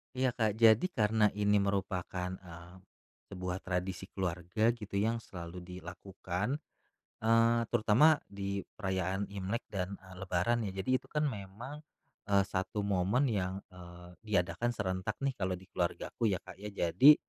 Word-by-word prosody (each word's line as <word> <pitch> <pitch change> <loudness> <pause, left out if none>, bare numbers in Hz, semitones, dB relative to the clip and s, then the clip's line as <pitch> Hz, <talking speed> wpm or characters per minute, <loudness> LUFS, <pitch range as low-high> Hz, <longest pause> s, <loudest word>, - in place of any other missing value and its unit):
Iya, 130 0 +2
Kak, 110 -4 +1
jadi 110 - +7
karena 110 0 +3
ini 105 0 +3
merupakan, 95 -2 -1
eee, 85 0 -12 0.6
sebuah 90 -1 -3
tradisi 90 +1 -2
keluarga 90 +4 0
gitu 110 -4 -4
yang 110 +4 +2
selalu 90 -5 -8
dilakukan, 90 - -4 0.6
eee, 115 +1 +4
terutama 120 +7 +5
di 100 0 -3 0.2
perayaan 95 -1 -1
Imlek 100 +3 -2
dan, 95 -1 -2
eee, 95 -1 -14
Lebaran 100 +5 +1
ya. 95 - -6
Jadi 130 +7 +1
itu - - -20
kan 150 0 0
memang, 120 +3 -4 0.5
eee, 100 -1 +4
satu 95 +2 -2
momen 100 +7 +2
yang, 95 -2 -1
eee, 90 0 -12
diadakan 105 +4 +1
serentak 95 -3 -2
nih 140 - +2
kalau 95 -1 0
di 95 +2 -15
keluargaku 90 +5 -1
ya, 95 -4 0
Kak, 95 0 -11
ya, 105 - -6
jadi, 100 - +6
100 Hz, 145 wpm, -33 LUFS, 90-110 Hz, 0.6 s, jadi